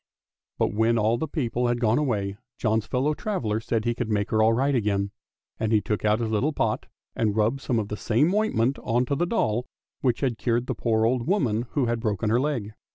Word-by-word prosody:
But - - +1
when 110 +2 +2
all 115 +2 +2
the 160 - -2
people 125 -5 -1
had 120 0 0
gone 115 +1 +2
away 100 -9 -1 0.2
John's 110 -1 0
fellow 140 +4 +1
traveller 135 - -2
said 115 0 -2
he 120 - +2
could 120 -1 -3
make 105 -1 0
her 110 - +3
all 110 +1 +5
right 135 +5 +1
again, 100 -4 0 0.5
and 110 -1 0
he 110 - +5
took 105 0 -2
out 105 +1 +3
his 115 -2 -2
little 130 +9 +1
pot 110 -5 -1 0.3
and 105 -3 0
rubbed 110 +5 +1
some 125 -4 0
of 105 -2 -2
the 105 - -4
same 135 - +2
ointment 140 - +1
on 120 +1 +1
to 140 - -1
the 175 +5 0
doll 125 - 0 0.3
which 125 -3 0
had 125 -5 0
cured 120 0 0
the - - -2
poor 110 -2 +1
old 120 0 0
woman 125 - +1
who 140 -4 +2
had 120 0 0
broken 110 -1 -1
her 120 - +3
leg. 125 -7 -2
115 Hz, 225 wpm, -25 LUFS, 110-130 Hz, 0.5 s, all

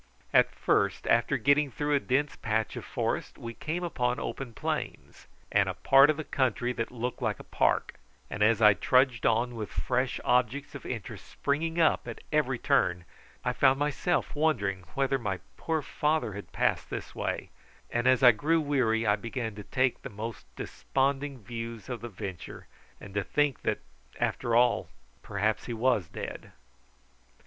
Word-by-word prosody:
At - - +6
first, - - +1
after 120 +4 +3
getting 140 +4 +3
through 145 +3 -1
a 145 - +4
dense 140 +2 0
patch 110 -1 -1
of - - -6
forest, - - -2
we 115 0 -7
came 165 +8 -4
upon 125 -7 0
open 135 -3 -5
plains, - - -5 0.2
and - - +3
a - - -3
part 135 +2 +6
of 155 - +2
the 155 - -3
country 125 -3 0
that 115 -1 -3
looked 125 0 -4
like - - -1
a - - -9
park; - - +1 0.3
and 100 - -6
as 110 +1 +4
I 105 -1 +9
trudged 125 +5 +3
on 115 +2 +2
with 110 -3 -5
fresh 125 0 -1
objects 125 +3 +1
of 140 - -8
interest 115 -7 -6
springing 160 +4 -1
up 160 - +3
at - - -7
every - - +2
turn, 90 0 +1 0.4
I - - +1
found 135 -1 +4
myself 150 +5 0
wondering 100 - 0
whether 135 0 +1
my 100 -6 -2 0.2
poor 160 -2 -1
father 150 -8 0
had 100 +1 -8
passed - - 0
this - - -6
way, - - -3 0.4
and 120 +1 +1
as 130 0 +4
I 125 - +10
grew 155 +9 +1
weary 125 -7 +1
I 105 -1 +4
began 115 +1 -4
to 105 0 -8
take 130 +4 0
the - - -7
most 110 - -7
desponding 135 -2 -2
views 115 +1 -6
of 120 -4 -4
the 120 - -6
venture, 95 -4 -7 0.3
and 100 - -11
to 100 0 0
think 145 +5 0
that, - - 0 0.4
after 115 -1 0
all, 120 0 +3 0.3
perhaps 105 +2 -1
he 120 - -3
was 115 -6 +2
dead. - - -7
125 Hz, 175 wpm, -29 LUFS, 110-140 Hz, 0.4 s, I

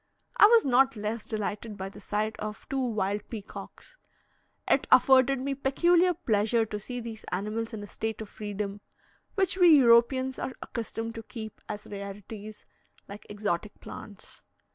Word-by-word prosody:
I 415 - +9
was 460 0 +5
not 265 0 +4
less 215 +1 -4
delighted 215 0 -4
by 190 0 -4
the 200 - -13
sight 210 +2 -2
of 215 0 -6
two 270 - -1
wild 210 -4 -1
peacocks. 215 - -9 0.7
It - - +2
afforded 265 0 +6
me 275 +2 -2
peculiar 345 +7 +3
pleasure 225 - +1
to 210 -1 -5
see 245 +4 -6
these 225 -2 -7
animals 215 +5 -3
in 215 -2 -6
a - - -6
state 220 +1 -4
of 220 - -6
freedom, 205 -1 -5 0.5
which 385 -2 +1
we 345 -5 +8
Europeans 260 +1 +4
are 260 - -3
accustomed 230 -1 -5
to 230 - -6
keep 220 -1 -9
as 210 0 -5
rarities, 205 +1 -8 0.4
like 200 +1 -10
exotic 205 -1 -3
plants. 205 -2 -11
220 Hz, 155 wpm, -28 LUFS, 210-260 Hz, 0.7 s, I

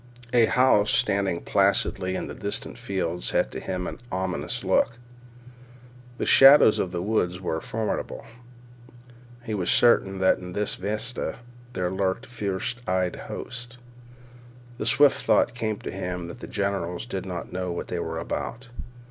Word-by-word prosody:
A 120 -2 +6
house 110 -4 +4
standing 100 -7 +1
placidly 95 -1 +1
in - - -3
distant - - -4
fields 90 -3 -2
had - - +1
to - - -5
him 90 -1 -4
an - - -6
ominous 95 0 -2
look. 115 - +2 1.2
The - - -2
shadows 135 -4 +8
of 95 - 0
the 85 0 -3
woods 90 -4 0
were 80 -4 -2
formidable. 110 -1 -3 1.2
He 110 -2 -4
was 95 -4 -1
certain 95 -5 +4
that 95 0 +3
in 90 -1 -8
this 105 +1 0
vista 110 +5 -3 0.4
there 90 -3 -1
lurked 95 +5 -1
fierce 105 -2 -3
eyed 90 -1 0
hosts. 120 -1 -7 1.0
The - - -1
swift 145 -1 +4
thought 120 - +3
came 110 -4 -2
to - - -5
him 90 -2 -4
that 105 - -9
the - - -8
generals 100 -3 -2
did 95 -5 -5
not 90 -1 -6
know 90 -1 -2
what 85 - -5
they 90 - -2
were 80 -1 -3
about. 120 +8 -5
95 Hz, 150 wpm, -25 LUFS, 90-110 Hz, 1.2 s, shadows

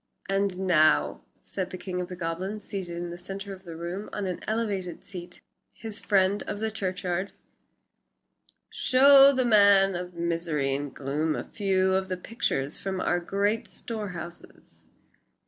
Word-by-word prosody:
"And 195 -1 0
now," 155 - +3 0.2
said 185 -2 -4
the 185 - -6
king 180 0 -4
of 180 - -4
the 180 - -7
goblins, 185 +5 -4
seated 180 -4 -5
in 175 0 -4
the 175 - -8
centre 195 +2 -6
of 190 0 -13
the 165 -1 -8
room 175 +5 -5
on 205 - -3
an 180 -2 -3
elevated 205 -6 -2
seat 180 -2 -9 0.3
his 220 -1 -6
friend 195 0 +2
of - - -3
the 220 +1 -2
churchyard 185 -2 -2 1.4
"show 275 +1 +7
the 260 -2 +1
man 200 -3 +6
of 180 0 -5
misery 165 -5 -1
and 140 0 -3
gloom 150 +4 -1
a - - -3
few 190 -2 +1
of 190 0 +1
the 185 - -2
pictures 180 - -2
from 190 -1 -3
our 175 - +1
great 200 +5 0
storehouses." 185 -6 -8
185 Hz, 155 wpm, -27 LUFS, 175-200 Hz, 1.4 s, show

